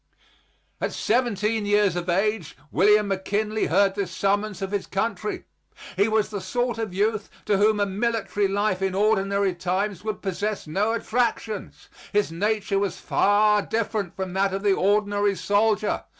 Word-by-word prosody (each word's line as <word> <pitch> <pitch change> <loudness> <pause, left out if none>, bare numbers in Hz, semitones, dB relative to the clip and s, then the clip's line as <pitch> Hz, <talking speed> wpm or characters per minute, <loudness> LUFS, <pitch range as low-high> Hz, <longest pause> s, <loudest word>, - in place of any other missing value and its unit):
At - - -1
seventeen 220 -2 0
years 205 -3 +3
of 175 0 -3
age 195 -1 0
William 210 +5 +4
McKinley 210 +3 -1
heard 200 -1 +3
this 200 -3 -3
summons 200 +2 -1
of 190 - -4
his 205 -2 -2
country. 230 - -3 0.5
He 200 +3 +3
was 220 -1 +1
the 205 -2 -4
sort 240 +5 -2
of 220 -3 -3
youth 210 +3 -1 0.2
to 205 -2 +2
whom 210 +1 +3
a 205 - +3
military 205 0 -1
life 195 -1 0
in 190 -1 0
ordinary 200 -2 +2
times 185 +2 -2
would 215 -1 -4
possess 200 +2 -2
no 200 +8 0
attractions. 230 -3 -2 0.2
His 205 -5 +1
nature 205 +2 0
was 200 -2 -2
far 210 +1 +3
different 215 -4 -2
from 190 -1 -4
that 195 0 +1
of 195 - -4
the 200 -1 +4
ordinary 205 +1 +1
soldier. 210 +2 +1
205 Hz, 155 wpm, -24 LUFS, 195-215 Hz, 0.5 s, William